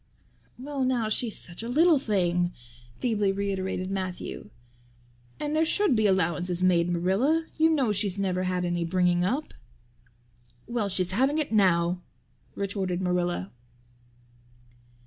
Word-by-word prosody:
"Well 275 +1 -3
now, 245 -4 0
she's 220 0 0
such 175 +2 -9
a 230 - -5
little 315 +3 +4
thing," 180 -6 0 0.4
feebly 210 -5 +1
reiterated 190 -1 -2
Matthew. 185 - -5 0.9
"And 300 0 -2
there 315 - +3
should 325 -2 +2
be 215 -1 +3
allowances 180 -1 0
made, 175 -2 +3
Marilla. 195 - +1
You 320 +1 +5
know 275 -8 +2
she's 205 -2 0
never 185 -2 0
had 180 -1 -1
any 175 -1 -1
bringing 175 0 +2
up." 260 +12 -2 1.1
"Well, 235 -4 -2
she's 185 -1 -1
having 265 +9 +2
it 305 -5 -1
now" 180 -4 +2 0.5
retorted 190 -3 -2
Marilla. 175 - -1
195 Hz, 125 wpm, -27 LUFS, 180-245 Hz, 1.1 s, You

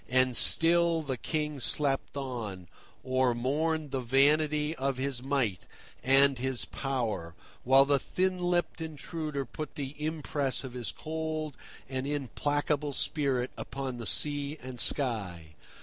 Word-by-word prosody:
And 130 0 +3
still 165 +2 +5
the 135 -3 -3
King 150 +2 -3
slept 140 +2 +2
on, 115 -9 -5 0.4
or 130 -1 +1
mourned 150 +4 -1
the 135 - -1
vanity 150 +4 +2
of 135 0 -1
his 130 -2 -2
might 130 -8 -1 0.4
and 135 0 +4
his 130 -1 -1
power, 115 -12 -3 0.3
while 135 +2 +6
the 140 0 +2
thin 185 +4 -1
lipped 175 -2 -1
intruder 155 -2 -5
put 155 +5 -7
the 140 -1 -5
impress 150 -4 -2
of 130 -2 -8
his 125 -2 -4
cold 155 -2 -4 0.3
and 130 +1 -3
implacable 145 +1 -1
spirit 135 -4 0
upon 135 -2 -5
the 115 - -5
sky 145 0 +1
and 130 -1 -7
sea. 95 - +2
140 Hz, 135 wpm, -29 LUFS, 130-150 Hz, 0.4 s, while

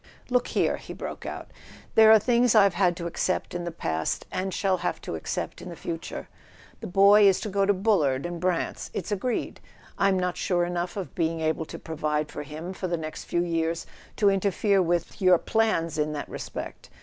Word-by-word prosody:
"Look 250 -1 +2
here," - - +1
he - - -9
broke - - -7
out, - - -7 0.4
"there 220 0 +7
are 220 - +9
things 240 +1 +3
I've 200 -3 +6
had 175 -1 +2
to 170 - -5
accept 175 +2 -1
in 175 0 -3
the 170 - -3
past, 80 - -2
and 190 +1 -2
shall 190 0 +1
have - - -2
to - - -6
accept - - -4
in 180 - -8
the 170 - -7
future. 165 0 -6 0.5
The - - -6
boy 200 +2 +6
is 195 - +4
to 215 - -3
go 200 0 0
into 200 +1 +3
Bullard 175 -10 +2
and 175 -1 -4
Brant's 180 -1 -1
—it's 185 - -4
agreed; 225 +4 -2 0.4
I'm 195 -1 +3
not 180 -1 -1
sure 175 -2 +1
enough 175 +1 -3
of 195 - -5
being 165 -1 -1
able 160 0 -1
to - - -8
pro¬ 160 - -7
vide 150 0 -1
for - - -5
him 155 +5 -7
for 185 - -4
the 175 -1 -1
next 155 -1 -6
few 175 - 0
years 165 -1 -1 0.3
to 205 -2 +4
interfere 195 +1 +2
with— 175 -1 0
with - - -17
your 185 -1 +6
plans 170 -7 0
in 150 0 0
that 145 - -4
respect. - - -7
180 Hz, 210 wpm, -26 LUFS, 165-200 Hz, 0.5 s, are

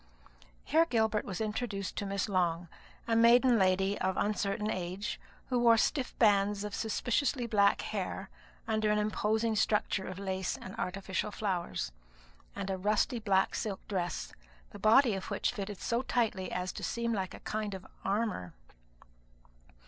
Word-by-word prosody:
Here 325 +2 +4
Gilbert 220 -7 +1
was 190 -3 -5
introduced 210 -2 -3
to 205 - -2
Miss 200 +1 -1
Long, 175 -3 0 0.4
a 230 - +2
maiden 235 +1 +6
lady 190 +1 +2
of 190 0 0
uncertain 210 0 0
age, 185 +3 -3 0.3
who 250 -2 +2
wore 230 -1 +6
stiff 260 +2 0
bands 205 -2 +3
of 210 -1 -5
suspiciously 245 +4 0
black 200 -3 +3
hair - - -4 0.4
under 215 -1 +1
an 210 - +3
imposing 215 +1 +1
structure 205 -2 +1
of 185 - -6
lace 190 -1 -2
and 190 - -9
artificial 190 +2 -2
flowers, 180 - -2 0.6
and 195 -1 -3
a 190 - -1
rusty 210 +4 +1
black 195 -3 +2
silk 200 -3 -4
dress, 175 -4 -3 0.4
the - - -10
body 230 +2 +5
of 190 -1 -4
which - - 0
fitted 205 -3 -5
so 235 +1 0
tightly 225 -7 -1
as 180 0 -2
to - - -8
seem 235 0 -1
like 190 -3 -3
a - - -11
kind 210 -2 -3
of 190 - -9 0.2
armour. 195 - -1
210 Hz, 155 wpm, -31 LUFS, 190-225 Hz, 0.6 s, maiden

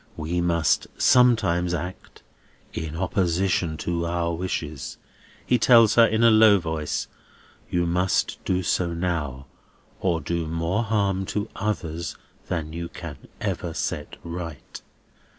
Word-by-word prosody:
"We 85 +3 -1
must 85 -3 +2
sometimes 100 -9 +4
act 90 +3 -7 0.5
in 80 -1 -4
opposition 90 -2 0
to 85 -1 -1
our 85 0 -1
wishes," 80 -5 -4 0.5
he 125 - +2
tells 115 -2 +6
her 115 -1 +7
in 110 +1 +1
a 115 - +7
low 110 -2 +7
voice. 80 -4 -3 0.6
"You 90 -1 +1
must 90 +2 0
do 90 0 0
so 85 0 0
now, 75 -7 -2 0.5
or 85 -4 +1
do 85 +1 -2
more 85 +6 -1
harm 100 -4 0
to 105 +1 -2
others 85 -6 -3 0.3
than 80 -3 -3
you 85 0 -5
can 80 -5 -9
ever 85 -2 -3
set 75 - -3
right." 85 -3 -7
85 Hz, 130 wpm, -24 LUFS, 80-95 Hz, 0.6 s, her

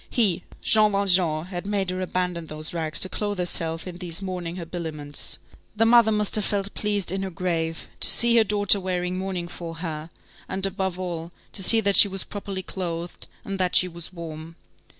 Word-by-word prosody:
He, 195 -7 0 0.2
Jean 215 -1 +3
Valjean, 180 -5 +2
had 180 +1 -7
made 195 -3 -2
her 185 0 -4
abandon 180 -2 -3
those 155 +2 -4
rags 160 -2 -1
to - - +6
clothe 205 +1 -4
herself 165 -2 0
in 180 -1 -9
these 175 -2 -2
mourning 180 -3 -6
habiliments. 160 -4 0 0.4
The 225 +1 +2
mother 230 -1 +5
must 210 -1 -1
have 215 - +2
felt 200 0 -2
pleased 205 -4 -1
in 190 0 -3
her 195 - -4
grave, 165 -3 -4
to - - +8
see 235 0 +7
her 225 - +6
daughter 205 -1 +4
wearing 180 -1 -3
mourning 185 -2 -4
for 170 -1 -8
her, 160 -2 -6 0.4
and, 190 0 0
above 190 -1 -3
all, 170 -2 -6 0.2
to 195 - 0
see 225 +4 +8
that 200 -2 +1
she - - +8
was 195 -1 0
properly 195 -2 -7
clothed, 175 -2 -6 0.2
and 195 -1 -5
that 180 -1 0
she 185 - +5
was 170 -1 -1
warm. 165 -2 -9
185 Hz, 190 wpm, -23 LUFS, 170-195 Hz, 0.4 s, to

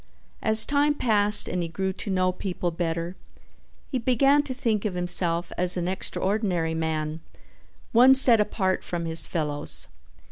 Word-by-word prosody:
As 220 0 +5
time 290 +1 0
passed 210 -5 +4
and 180 - -4
he 170 - -4
grew 190 +3 -4
to 205 - -8
know 185 -1 -1
people 180 -1 -5
better, 170 +1 -5 0.8
he 260 - -3
began 275 +4 +1
to 290 -2 -9
think 230 -5 -3
of 205 -4 -5
himself 175 -1 0
as 180 0 +8
an 175 0 -4
extraordinary 185 -2 -3
man, 160 -1 -4 0.7
one 255 +3 +5
set 245 -5 +5
apart 190 -3 -3
from 170 -1 -6
his 165 0 +1
fellows. 150 - -3
185 Hz, 150 wpm, -23 LUFS, 170-220 Hz, 0.8 s, as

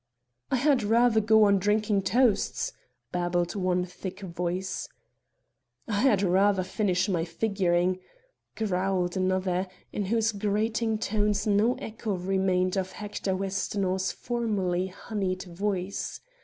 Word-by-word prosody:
"I - - +2
had 270 0 +3
rather 225 +1 +4
go 220 +1 +5
on 200 -1 +5
drinking 210 +1 +2
toasts," 235 - +1 0.4
babbled 175 0 0
one 180 -2 +1
thick 185 +2 -8
voice. 180 +1 -3 1.0
"I 205 -3 0
had 220 -7 +4
rather 190 +1 +3
finish 185 -1 0
my 175 -5 0
figuring," 185 -1 0 0.6
growled 185 -3 0
another, 185 0 0 0.3
in 205 - -1
whose 225 +2 +2
grating 220 +2 0
tones 210 -1 0
no 215 +4 +3
echo 225 -5 -4
remained 185 0 +1
of 190 -1 -2
Hector 205 -2 -3
Westonhaugh's 190 0 -1
formerly 200 -7 -1
honeyed 190 -1 -3
voice. 190 +1 -3
195 Hz, 115 wpm, -27 LUFS, 185-215 Hz, 1.0 s, go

